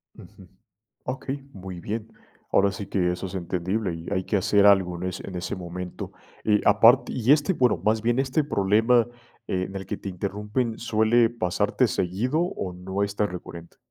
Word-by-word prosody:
Ujú, 95 - -15 0.6
okey, 135 +2 -5
muy 95 -2 -8
bien. 110 +4 -5 0.4
Ahora 100 0 +4
sí 100 0 -6
que 90 -3 +1
eso 90 +2 -4
es 90 - -8
entendible, 95 +2 -2
y 80 +1 -9
hay 95 -2 0
que 105 - 0
hacer 100 +1 +4
algo 95 -3 +4
en 90 +2 -3
ese 95 - -6
en 95 - -6
ese 90 - -3
momento. 90 0 -6 0.3
Eh, 105 -1 +3
aparte 115 +5 +5
y 125 0 0
este 150 +5 +3
bueno, 125 - +3
más 110 +1 +2
bien 120 +2 +1
este 135 +3 +1
problema 115 0 +3 0.4
en 95 +1 -2
el 95 - -6
que 100 - -3
te 100 - -7
interrumpen, 105 +5 -2
¿suele 115 0 +3
pasarte 90 -7 +1
seguido, 110 - 0
o 135 - -3
no 95 +2 -3
es 100 0 -2
tan 105 - +1
recurrente? 85 -1 -9
100 Hz, 180 wpm, -25 LUFS, 90-115 Hz, 0.6 s, aparte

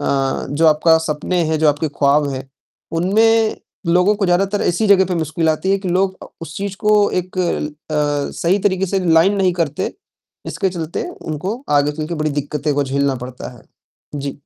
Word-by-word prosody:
अ, 135 -2 -1
जो 160 +3 +2
आपका 160 +1 +5
सपने 160 +3 -1
हैं, 155 0 0
जो 155 -1 +3
आपके 150 +2 0
ख्वाब 145 +1 +2
हैं, 135 0 -6 0.4
उनमें 220 +6 +3 0.3
लोगों 180 +5 +3
को 205 - -1
ज़्यादातर 195 +3 +1
ऐसी 195 +5 +1
जगह 190 -1 +6
पे 180 - -2
मुश्किल 160 +1 -1
आती 160 +5 0
है 195 - +2
कि 190 -2 -5
लोग 190 +1 +1
अ, - - -11 0.2
उस 160 -1 -8
चीज़ 200 -1 -4
को 210 0 +5 0.3
एक 185 +1 -10
ल 175 -4 0
अ, 150 -1 -2
सही 180 +4 +2
तरीके 190 0 -1
से 195 +1 -1
लाइन 185 +5 +5
नहीं 185 -2 +2
करते, 145 -2 -3 0.5
इसके 195 - -1
चलते 170 - -4
उनको 190 - -5 0.2
आगे 145 +1 +1
चलके 155 +3 -4
बड़ी 155 -1 -1
दिक्कतें 150 +1 -2
को 145 0 +1
झेलना 140 0 0
पड़ता 125 0 -8
है। - - -18 0.5
जी। 140 0 -5
165 Hz, 190 wpm, -18 LUFS, 150-190 Hz, 0.5 s, जगह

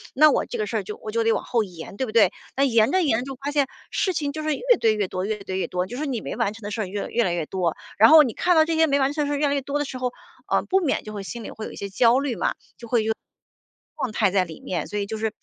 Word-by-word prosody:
那 305 +1 +7
我 - - +1
这 240 - -5
个 215 - -1
事 220 +2 -2
儿 205 - -2
就 210 +3 -7
我 215 - -7
就 230 0 +1
得 225 - +3
往 - - -2
后 235 -3 +1
延， 180 +1 -10
对 260 - 0
不 - - -5
对？ 225 -2 +5 0.2
那 275 - +2
延 230 -2 +4
着 375 -1 +3
延 235 -7 +2
着 245 - -5
就 270 -1 -6
发 280 +3 -4
现， 285 -2 +2 0.2
事 375 -2 0
情 290 -3 -1
就 310 - -5
是 310 -2 0
越 - - -9 0.2
堆 220 -1 +3
越 205 -3 -1
多 185 +1 -3
越 215 +1 -2
堆 190 0 -3
越 - - -1
多， 180 0 -2
就 245 +6 -7
说 305 - -2
你 250 -6 -2
没 - - -5
完 205 - 0
成 225 -1 -13
的 205 - -5
事 220 - -2
儿 - - -1
越 200 +2 -4
来 - - -6
越 235 0 +2
来 175 - 0
越 165 -3 -2
多， 175 -3 -1 0.2
然 225 - +8
后 315 -1 +9
你 240 - -2
看 360 -1 +2
到 315 0 +6
这 330 - -1
些 320 0 +4
没 280 0 +2
完 270 +1 +2
成 295 -2 -1
的 - - -2
事 - - 0
越 295 - +2
来 280 - +1
越 280 - 0
多 280 +2 -2
的 290 - -1
时 260 - -6
候， 250 -1 -2 0.3
呃， - - +1
不 385 +1 +2
免 315 -7 0
就 215 - -8
会 205 - -5
心 235 +3 -7
里 - - -7
会 220 - -7
有 - - -7
一 - - -10
些 200 - -5
焦 235 +5 +4
虑 270 -7 -2
嘛， - - 0 0.2
就 235 - -10
会 230 -1 +2
有 220 0 +1 0.8
状 240 -5 -3
态 205 -4 +2
在 190 -2 +2
里 160 -2 -11
面。 180 - -3
所 210 - -4
以 200 - -1
就 220 +2 -5
是 220 0 -2
230 Hz, 375 characters per minute, -24 LUFS, 205-280 Hz, 0.8 s, 后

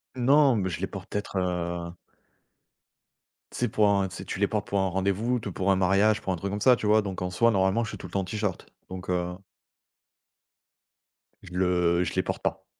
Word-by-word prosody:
Non 135 0 +4
mais 95 -2 -1
je 85 0 -5
les 95 - -1
porte 95 -2 -9
peut-être, 105 -1 -4
heu 85 -1 -2 1.6
tu - - -9
sais - - +2
pour 105 - +2
en 100 -1 +2
tu 95 - -10
sais - - -7
tu 95 - -5
les 100 - +3
portes 105 -1 -2
pour 100 - 0
un 95 - +2
rendez-vous, 100 +6 0
tout 105 -3 -6
pour 95 +2 0
un - - +4
mariage, 100 +3 +3
pour 95 - -2
un 90 - -3
truc 100 +3 -4
comme 105 - -4
ça 125 +2 +6
tu 105 - -3
vois? 110 +1 +5
Donc 95 -3 -5
en 90 - -1
soi 115 +6 +3
normalement 95 +3 +2
je 110 - -5
suis - - -7
tout 90 - -8
le - - -16
temps 100 - 0
en - - -4
t-shirt, 105 0 -3 0.2
donc, 90 -1 -7
heu 90 0 -1 2.1
je 90 - -12
le 90 -1 +2
je 85 - -3
les - - +3
porte - - -4
pas. - - -2
95 Hz, 230 wpm, -27 LUFS, 90-105 Hz, 2.1 s, ça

